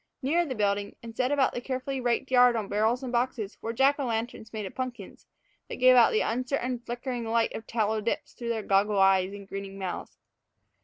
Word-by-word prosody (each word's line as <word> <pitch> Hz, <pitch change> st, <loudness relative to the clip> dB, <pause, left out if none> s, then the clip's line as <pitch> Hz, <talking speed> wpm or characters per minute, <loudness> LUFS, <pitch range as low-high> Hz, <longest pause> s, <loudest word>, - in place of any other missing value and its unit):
Nearer 335 Hz, +6 st, +2 dB
the 260 Hz, -, -3 dB
building, 205 Hz, -1 st, 0 dB
and 230 Hz, -1 st, -9 dB
set 255 Hz, +2 st, 0 dB
about 280 Hz, -2 st, +2 dB
the 245 Hz, -, -4 dB
carefully 260 Hz, +1 st, -3 dB
raked 245 Hz, +2 st, 0 dB
yard 245 Hz, -1 st, +6 dB
on 215 Hz, -3 st, -2 dB
barrels 220 Hz, +6 st, +1 dB
and 255 Hz, -, -4 dB
boxes, 235 Hz, -4 st, -2 dB
were 225 Hz, -, -3 dB
Jack 270 Hz, +5 st, +3 dB
o' 275 Hz, -, -1 dB
lanterns 225 Hz, -1 st, -3 dB
made 215 Hz, -2 st, -4 dB
of 190 Hz, -, -7 dB
pumpkins, 250 Hz, -6 st, -6 dB, 0.4 s
that -, -, -4 dB
gave 255 Hz, 0 st, +6 dB
out 240 Hz, -2 st, +6 dB
the 215 Hz, -, +2 dB
uncertain, 250 Hz, +1 st, -1 dB
flickering 240 Hz, +1 st, -4 dB
light 225 Hz, 0 st, +1 dB
of 225 Hz, -, -7 dB
tallow 220 Hz, -1 st, 0 dB
dips 230 Hz, -, -3 dB
through 235 Hz, -1 st, -6 dB
their 225 Hz, -2 st, -1 dB
goggle 200 Hz, +1 st, +2 dB
eyes 195 Hz, -1 st, +4 dB
and 200 Hz, -1 st, -10 dB
grinning 195 Hz, 0 st, -6 dB
mouths. 190 Hz, -2 st, -5 dB
235 Hz, 210 wpm, -28 LUFS, 210-255 Hz, 0.4 s, yard